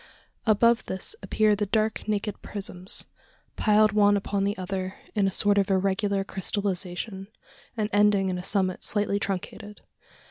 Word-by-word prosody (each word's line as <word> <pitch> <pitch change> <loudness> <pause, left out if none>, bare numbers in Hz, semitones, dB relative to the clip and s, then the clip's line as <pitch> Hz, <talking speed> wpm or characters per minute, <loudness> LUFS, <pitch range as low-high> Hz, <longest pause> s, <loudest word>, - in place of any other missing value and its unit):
Above 230 +2 +4
this 190 - -3
appear 215 -1 +2
the 205 0 -2
dark 215 +1 0
naked 210 -1 -2
prisms 190 -2 -5 0.5
piled 215 -1 +4
one 205 0 +4
upon 200 0 -1
the 200 +1 -1
other, 185 0 -4 0.2
in 205 -3 +2
a - - 0
sort 205 +1 +3
of 195 - +1
irregular 195 +1 +1
crystallisation, 195 0 -3 0.5
and 215 -1 0
ending 205 -1 +4
in 180 -1 -2
a - - -6
summit 190 -1 0
slightly 205 -1 0
truncated. 205 +2 -5
200 Hz, 145 wpm, -26 LUFS, 190-210 Hz, 0.5 s, Above